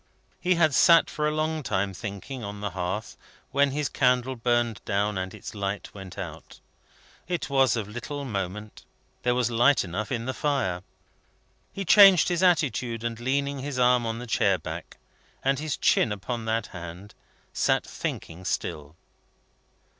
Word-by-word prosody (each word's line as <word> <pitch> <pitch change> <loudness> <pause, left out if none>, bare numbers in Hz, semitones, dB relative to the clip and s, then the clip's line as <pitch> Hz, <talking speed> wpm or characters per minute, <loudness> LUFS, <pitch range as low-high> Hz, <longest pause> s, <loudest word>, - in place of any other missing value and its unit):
He 180 0 +2
had 155 -3 +3
sat 165 +3 +6
for 150 0 -1
a - - +1
long 155 +1 -1
time 95 -6 -1
thinking, 105 +6 -6
on 100 0 -6
the 105 -1 -3
hearth, 95 +4 -4 0.4
when 140 +1 +3
his 145 +1 -1
candle 125 0 +1
burned 120 -1 0
down 105 0 0
and 95 0 -3
its - - -9
light 100 -1 -4
went 95 -2 -10
out. 85 -5 -8 0.7
It 175 -4 -3
was 135 -4 +4
of 110 -4 -3
little 130 +6 -6
moment; 105 -1 -5 0.4
there 125 0 +1
was 120 -1 +1
light 120 +3 +4
enough 100 +6 -4
in 115 -2 -2
the 130 - -2
fire. 130 -12 -1 0.9
He 195 - -5
changed 195 -2 +8
his 175 0 0
attitude, 125 - +1
and, 115 -1 -3
leaning 140 +3 -1
his 140 0 -4
arm 125 -1 +3
on 115 0 -2
the 120 - -6
chair 100 -4 +2
back, 80 - -8 0.5
and 135 0 +1
his 155 -1 -2
chin 115 - +3
upon 110 +3 -4
that 110 0 0
hand, 85 +3 -9 0.4
sat - - +2
thinking 85 +3 -5
still. 75 -3 -3
120 Hz, 160 wpm, -26 LUFS, 100-140 Hz, 0.9 s, changed